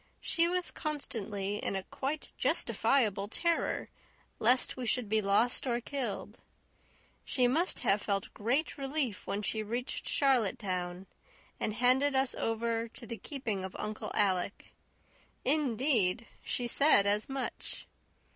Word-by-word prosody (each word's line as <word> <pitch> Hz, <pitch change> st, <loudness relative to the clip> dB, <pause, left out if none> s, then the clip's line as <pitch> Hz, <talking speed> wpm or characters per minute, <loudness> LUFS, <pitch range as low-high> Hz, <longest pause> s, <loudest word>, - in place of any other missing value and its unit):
She 335 Hz, -1 st, +2 dB
was 360 Hz, 0 st, 0 dB
constantly 210 Hz, -, -3 dB
in 195 Hz, -, -2 dB
a 190 Hz, -, -2 dB
quite 285 Hz, +8 st, -4 dB
justifiable 210 Hz, -7 st, +2 dB
terror 335 Hz, +9 st, -1 dB, 0.5 s
lest 245 Hz, +3 st, +4 dB
we 255 Hz, -2 st, -4 dB
should 245 Hz, -1 st, +1 dB
be 215 Hz, +1 st, +2 dB
lost 215 Hz, +6 st, +2 dB
or 240 Hz, -1 st, +1 dB
killed; 245 Hz, -5 st, -4 dB, 0.8 s
she 250 Hz, -2 st, +2 dB
must 325 Hz, +9 st, +1 dB
have 205 Hz, -4 st, +3 dB
felt 200 Hz, -1 st, -2 dB
great 260 Hz, +9 st, 0 dB
relief 270 Hz, -7 st, -2 dB
when 205 Hz, +1 st, -2 dB
she 220 Hz, +2 st, 0 dB
reached 240 Hz, +4 st, -3 dB
Charlottetown 190 Hz, -8 st, +1 dB, 0.5 s
and 215 Hz, -, -1 dB
handed 260 Hz, +4 st, +3 dB
us 265 Hz, -1 st, +2 dB
over 230 Hz, 0 st, -1 dB
to 235 Hz, +1 st, -11 dB
the 230 Hz, 0 st, -6 dB
keeping 225 Hz, -7 st, -4 dB
of 190 Hz, -, -6 dB
Uncle 215 Hz, 0 st, -4 dB
Alec. 195 Hz, -1 st, 0 dB, 0.7 s
Indeed, 250 Hz, -7 st, +2 dB, 0.2 s
she 245 Hz, -, -2 dB
said 240 Hz, -4 st, +6 dB
as 205 Hz, +4 st, +1 dB
much. 270 Hz, -1 st, -4 dB
235 Hz, 130 wpm, -31 LUFS, 205-270 Hz, 0.8 s, said